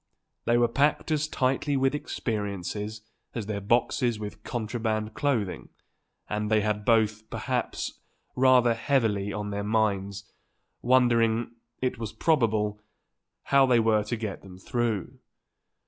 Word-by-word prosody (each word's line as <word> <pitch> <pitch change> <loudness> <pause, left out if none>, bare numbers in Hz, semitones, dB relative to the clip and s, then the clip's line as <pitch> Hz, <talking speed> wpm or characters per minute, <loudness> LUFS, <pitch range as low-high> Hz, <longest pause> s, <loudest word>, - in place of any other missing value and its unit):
They 120 - +3
were 120 0 +4
packed 145 +6 +1
as 155 0 +1
tightly 135 +1 0
with 135 +1 +2
experiences 105 -5 -3 0.3
as 115 -4 -3
their 100 -1 -3
boxes 120 +2 +1
with 105 0 -7
contraband 110 -2 -2
clothing, 115 -10 -1 0.6
and 105 0 -2
they 110 -1 +3
had 105 0 -1
both, 110 -1 +2
perhaps, - - -3 0.4
rather 125 -2 +5
heavily 115 -5 +1
on 105 0 -4
their 100 0 -2
minds, 100 -2 0 0.6
wondering, 120 -2 +3 0.3
it 125 -2 -1
was 110 -2 -5
probable, 110 -9 +1 0.6
how 135 -1 +4
they 120 -2 +4
were 110 -1 +3
to 115 - -2
get 110 -3 -5
them 95 -2 -12
through. 110 0 -2
110 Hz, 130 wpm, -27 LUFS, 105-125 Hz, 0.6 s, rather